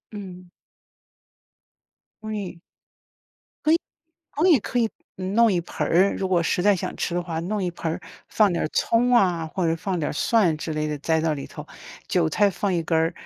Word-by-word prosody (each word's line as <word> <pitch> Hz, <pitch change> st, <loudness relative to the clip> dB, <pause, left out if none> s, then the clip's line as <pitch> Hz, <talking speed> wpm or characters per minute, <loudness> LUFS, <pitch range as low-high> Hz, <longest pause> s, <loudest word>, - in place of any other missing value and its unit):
嗯。 185 Hz, -3 st, -8 dB, 1.8 s
味 205 Hz, -5 st, -5 dB, 1.0 s
可 310 Hz, -, +4 dB
以 330 Hz, -, +6 dB, 0.6 s
可 320 Hz, +5 st, +2 dB
以 295 Hz, -8 st, +6 dB
可 245 Hz, +4 st, -2 dB
以 225 Hz, -2 st, +2 dB, 0.3 s
嗯 190 Hz, +1 st, -4 dB
弄 230 Hz, -2 st, +5 dB
一 175 Hz, -, +1 dB
盆 -, -, -4 dB
儿， 185 Hz, +4 st, +3 dB
如 190 Hz, -, -2 dB
果 175 Hz, -2 st, +3 dB
实 175 Hz, -, 0 dB
在 205 Hz, +1 st, +4 dB
想 180 Hz, -, -4 dB
吃 175 Hz, -, -2 dB
的 175 Hz, -, +1 dB
话， 165 Hz, -2 st, -3 dB
弄 195 Hz, +3 st, -2 dB
一 175 Hz, -, -1 dB
盆 165 Hz, -1 st, -3 dB
儿 -, -, -4 dB, 0.3 s
放 210 Hz, -4 st, +3 dB
点 -, -, -1 dB
儿 -, -, 0 dB
葱 245 Hz, +2 st, +2 dB
啊， 175 Hz, -8 st, +3 dB
或 180 Hz, +2 st, -2 dB
者 165 Hz, -, +1 dB
放 180 Hz, +3 st, -3 dB
点 150 Hz, -, -1 dB
儿 -, -, -4 dB
蒜 185 Hz, -2 st, +2 dB
之 155 Hz, 0 st, -4 dB
类 155 Hz, 0 st, -1 dB
的， 150 Hz, -, -2 dB
栽 160 Hz, +2 st, +1 dB
到 160 Hz, -1 st, +1 dB
里 140 Hz, -, -6 dB
头， -, -, -9 dB, 0.4 s
韭 80 Hz, -, +2 dB
菜 205 Hz, -, +3 dB
放 195 Hz, +1 st, -2 dB
一 170 Hz, -2 st, 0 dB
根 165 Hz, -, 0 dB
儿。 160 Hz, +2 st, +2 dB
180 Hz, 220 characters per minute, -24 LUFS, 165-205 Hz, 1.8 s, 以